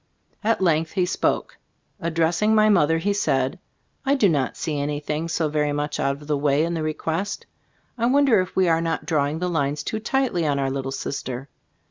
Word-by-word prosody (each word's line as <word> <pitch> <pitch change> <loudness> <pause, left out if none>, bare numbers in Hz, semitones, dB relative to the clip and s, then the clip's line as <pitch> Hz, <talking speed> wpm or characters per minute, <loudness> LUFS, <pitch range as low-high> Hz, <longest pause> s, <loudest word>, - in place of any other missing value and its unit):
At 225 -1 +1
length 160 -2 +2
he 185 -3 +2
spoke. - - -1 0.4
Addressing 165 +6 +1
my 215 0 +5
mother, 165 -5 +4
he 200 +5 0
said: 140 -4 0 0.4
"I 275 +1 +2
do 230 -7 +4
not 140 -5 0
see 150 -3 -2
anything 150 +2 -2
so 165 -1 0
very 150 -1 0
much 145 0 -2
out 140 0 0
of 150 - -13
the 150 - +1
way 145 +1 +2
in 170 - -2
the 165 - -2
request. 160 +5 -3 0.5
I 235 - +2
wonder 265 -5 +4
if 185 - -6
we 190 -1 +3
are 165 -1 +3
not 165 -1 -2
drawing 150 -1 0
the 180 +2 -2
lines 145 -4 -1
too 220 - -3
tightly 240 -6 0
on 145 -1 +1
our 135 -1 0
little 135 0 -3
sister? 135 -1 -5
160 Hz, 195 wpm, -23 LUFS, 145-185 Hz, 0.5 s, my